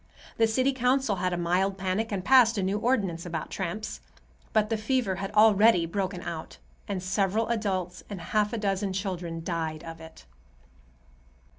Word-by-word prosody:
The 225 - +4
city 255 +5 +1
council 255 -4 +1
had 180 0 0
a 175 - -1
mild 185 +3 +1
panic 195 +4 -1
and 190 -3 -3
passed 245 -4 +6
a 195 - 0
new 195 +3 0
ordinance 200 -8 0
about 165 -3 -5
tramps. 190 +4 -4 0.5
But 215 0 +2
the - - +3
fever 215 -4 0
had 195 0 -4
already 215 -3 +5
broken 185 +1 -3
out, 165 -2 -6 0.3
and 195 -3 -3
several 200 +4 0
adults 190 -6 -2
and 200 -3 -6
half 210 +4 0
a 235 - -2
dozen 195 -2 -1
children 180 -4 -4
died 160 -2 -3
of 165 -1 -9
it. 160 - -13
195 Hz, 165 wpm, -27 LUFS, 180-220 Hz, 0.5 s, passed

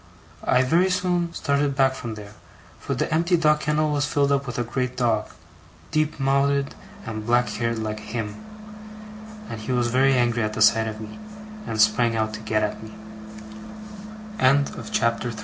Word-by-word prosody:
I 125 +1 +4
very 170 +8 +3
soon 180 -2 0
started 140 -3 0
back 135 -1 +3
from 120 -4 -6
there, 105 -1 -10 0.5
for - - -3
the - - -1
empty 170 +2 +2
dog 150 -2 +3
kennel 150 0 0
was 145 0 0
filled 140 -1 +2
up 140 0 +1
with 125 - -5
a 120 - 0
great 125 +2 -3
dog 115 -4 +1 0.6
deep 155 -1 0
mouthed 140 +1 +1 0.3
and 110 -1 -5
black 120 +2 +2
haired 115 -1 -2
like 110 -1 -3
Him 110 - -5 1.0
and 110 - -7
he 110 - -4
was 120 -1 +1
very 135 +2 +3
angry 120 -1 +2
at 110 -1 -1
the 110 - -4
sight 110 +1 +4
of 110 -1 -5
me, 110 - -9 0.5
and 110 - -3
sprang 115 +2 +3
o 110 0 0
125 Hz, 150 wpm, -24 LUFS, 115-145 Hz, 1.0 s, I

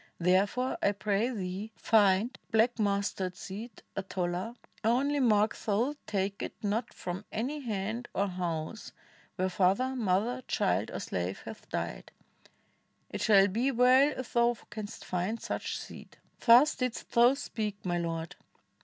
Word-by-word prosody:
Therefore, 195 +8 +1
I 200 - +3
pray 205 +3 0
thee, 200 -1 -4
find 210 +2 +3
Black 225 +2 +2
mustard 200 -3 0
seed, 215 +6 -8
a 195 - -1
tola; 185 +3 -3 0.3
only 270 +6 +2
mark 215 -4 +3
Thou 230 +7 0
take 200 -1 -1
it - - -4
not 215 +3 -1
from 180 +3 -5
any 260 +8 -2
hand 225 -1 -3
or 200 - +2
house 175 +1 -4 0.4
Where 185 0 0
father, 195 +8 +2
mother, 225 +3 0
child, - - +1
or - - -5
slave - - -3
hath - - -10
died; - - -4 1.0
It - - -4
shall 200 -3 +6
be 235 +8 +1
wtU 260 +3 +5
if 255 -1 -6
thou 235 0 +3
canst 210 0 -7
find 185 +6 -2
such - - -3
seed.' - - -10 0.2
Thus 250 +6 +7
didst 255 -2 -4
thou 240 +2 +6
speak, 215 -7 -4
my 175 -1 0
Lord!" 165 -1 -3
215 Hz, 145 wpm, -30 LUFS, 190-240 Hz, 1.0 s, Thus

